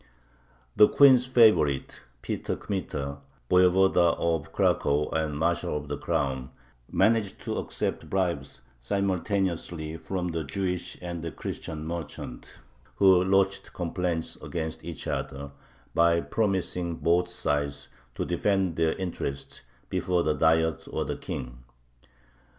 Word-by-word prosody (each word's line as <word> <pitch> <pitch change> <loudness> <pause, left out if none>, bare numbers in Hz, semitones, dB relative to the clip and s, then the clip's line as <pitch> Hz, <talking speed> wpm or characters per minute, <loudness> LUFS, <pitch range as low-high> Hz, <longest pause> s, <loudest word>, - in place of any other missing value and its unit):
The 105 - +8
queen's 130 -3 +6
favorite, 110 - +3 0.2
Peter - - -2
Kmita, 70 -8 -4 0.3
Voyevoda 90 -1 +5
of 80 -3 -1
Cracow 75 +1 +1
and 80 -2 -1
Marshal 85 -1 0
of 75 0 -7
the 75 - -2
Crown, 65 -1 -1 0.4
managed 110 -3 +2
to - - -3
accept - - -3
bribes 85 -8 -2 0.2
simultaneously 90 - -1
from 90 +1 -3
the 80 -1 -2
Jewish 90 +4 -3
and 85 -1 -4
the 85 - -4
Christian 80 +2 -6
merchants, 80 -6 -6 0.5
who 95 -2 +6
lodged 95 +1 +1
complaints 85 -1 -2
against 80 -1 -4
each 85 -2 -6
other, 70 +1 -4 0.4
by 85 0 +4
promising 90 -4 -1
both 85 +2 +2
sides 70 -4 -2 0.3
to - - -2
defend 95 -4 0
their 80 -1 +2
interests 85 -7 -5 0.3
before 90 -2 0
the 75 - +2
Diet 80 +1 +2
or - - -2
the - - -3
King. 60 -1 -6
85 Hz, 120 wpm, -27 LUFS, 75-95 Hz, 0.5 s, The